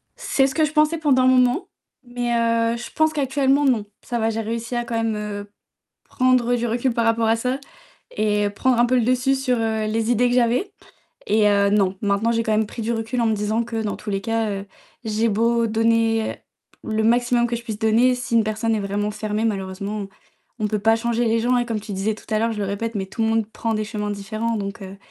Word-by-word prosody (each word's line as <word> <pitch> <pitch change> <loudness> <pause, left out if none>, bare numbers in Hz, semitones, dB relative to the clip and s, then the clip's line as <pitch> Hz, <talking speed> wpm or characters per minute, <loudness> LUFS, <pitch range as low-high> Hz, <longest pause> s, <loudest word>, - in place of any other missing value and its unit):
C'est 270 -1 +1
ce 265 - -5
que 315 - +3
je 295 - -4
pensais 305 +1 +2
pendant 280 -5 +3
un - - +4
moment, 255 +5 +3 0.4
mais, 245 -1 -3
heu, 230 0 +1
je 240 - -8
pense 315 0 +2
qu'actuellement 275 0 +2
non. 235 -6 +2 0.2
Ça 240 -1 -3
va, 225 0 +1
j'ai 225 0 -2
réussi 230 +2 -4
à 240 0 -1
quand 235 - -4
même, 225 -1 0
heu, 205 -1 -5 0.5
prendre 255 -2 +2
du 240 0 0
recul 240 +2 0
par 230 0 0
rapport 225 0 +2
à 225 - +3
ça 250 +3 -1 0.6
et 210 -1 +1
prendre 245 +4 +1
un 240 - +5
peu 255 +1 +2
le 245 - +3
dessus 255 +2 +2
sur, 265 -2 0
heu, 220 -1 -1
les 220 +1 -1
idées 245 +1 +3
que 245 - 0
j'avais. 250 - +1 0.6
Et 210 0 +3
heu, 200 -1 +3
non, 195 -2 +1
maintenant 205 +2 +1
j'ai 230 0 0
quand 220 - -1
même 215 0 +2
pris 230 - -7
du 235 +2 -1
recul 225 +2 -3
en - - +2
me 220 - +2
disant 215 +3 0
que 230 -1 -4
dans 210 - -2
tous 215 - -8
les 195 -1 -1
cas, 225 0 -1
heu, 195 0 -5 0.4
j'ai 220 0 0
beau 230 +2 +2
donner 225 0 +1 0.5
le 220 0 -1
maximum 240 +1 +3
que 235 - -2
je 235 - -6
puisse 220 -3 -5
donner, 230 +3 +3
si 245 -1 -3
une 225 - +5
personne 215 +1 -1
est - - -1
vraiment 205 +1 -2
fermée, 215 +1 -2
malheureusement 200 0 -3 0.5
on 215 - 0
peut 210 0 -1
pas 225 +2 +4
changer 235 +1 0
les 225 0 +2
gens 245 +2 +2
et 240 - +1
comme 225 -3 -3
tu 215 - -8
disais 200 +3 -1
tout 220 - -16
à 215 - +2
l'heure, 230 +1 0
je 210 - -6
le - - -1
répète, 215 +4 -3
mais 190 -1 -2
tout 210 - -5
le 225 - +2
monde 225 -1 +1
prend 225 0 -2
des 215 0 -1
chemins 210 -1 -4
différents 215 +3 -3
donc, 200 +1 -5
heu, 190 +1 -9
225 Hz, 245 wpm, -22 LUFS, 215-240 Hz, 0.6 s, un